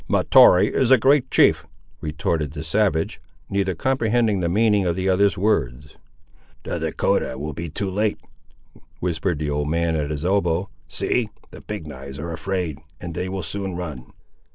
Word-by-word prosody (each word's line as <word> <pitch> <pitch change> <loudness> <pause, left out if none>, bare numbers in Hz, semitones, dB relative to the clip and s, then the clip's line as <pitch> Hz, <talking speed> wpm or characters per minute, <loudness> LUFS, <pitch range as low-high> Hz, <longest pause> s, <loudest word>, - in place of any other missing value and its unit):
"Mahtoree 90 +2 +6
is 130 - +2
a 130 - +8
great 135 +3 +3
chief!" 80 +1 +4 0.3
retorted 75 -1 -2
the 75 - -6
savage; 95 -1 0 0.3
neither 95 -2 0
comprehending 115 -1 +1
the 85 -2 0
meaning 105 +1 +3
of 85 -2 0
the 95 +1 -2
other's 95 0 +3
words. 70 - -1 0.7
"The - - -3
Dahcotah 65 - 0
will 75 +3 -4
be 85 0 -5
too 95 +5 -3
late," 105 +2 0 0.8
whispered 90 -1 -1
the 75 0 -2
old 75 0 -1
man 85 0 0
at 75 -2 -1
his 75 +1 -4
elbow; 95 -1 +1 0.2
"see; 120 -4 0 0.2
the - - -11
Big 105 -6 -6
knives 70 -2 -9
are 85 +3 -5
afraid, 85 -2 -3 0.2
and 85 -1 -6
they 90 +4 -3
will 95 0 -4
soon 95 -2 -4
run." 75 -8 -7
90 Hz, 165 wpm, -22 LUFS, 75-100 Hz, 0.8 s, a